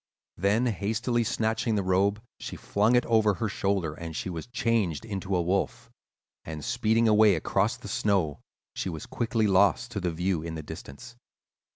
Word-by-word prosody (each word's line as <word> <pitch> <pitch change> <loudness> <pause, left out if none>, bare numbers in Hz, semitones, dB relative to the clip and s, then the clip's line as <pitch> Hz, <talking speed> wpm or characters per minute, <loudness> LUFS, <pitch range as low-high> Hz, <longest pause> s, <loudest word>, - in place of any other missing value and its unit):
"Then 100 +7 +2
hastily 115 +3 0
snatching 110 +1 0
the 100 - 0
robe 100 +4 +1 0.2
she - - -6
flung 105 +4 +1
it 125 - +3
over 110 -3 +3
her 110 - -2
shoulders, 95 -6 -1
and 80 -1 -6
she 95 - -3
was 80 +2 -6
changed 115 -7 0
into 100 -3 -3
a 90 - +2
wolf, 95 +3 -1 0.5
and, 80 -1 -6
speeding 115 -1 +2
away 105 -2 +6
across 80 - 0
the - - -10
snow, 95 -8 0 0.3
she - - -3
was 80 -3 -6
quickly 115 -2 0
lost 100 +4 +3
to 105 - -3
view 90 +1 -1
in 80 0 -5
the 80 - -6
distance. 120 +14 -10
100 Hz, 170 wpm, -27 LUFS, 90-115 Hz, 0.5 s, away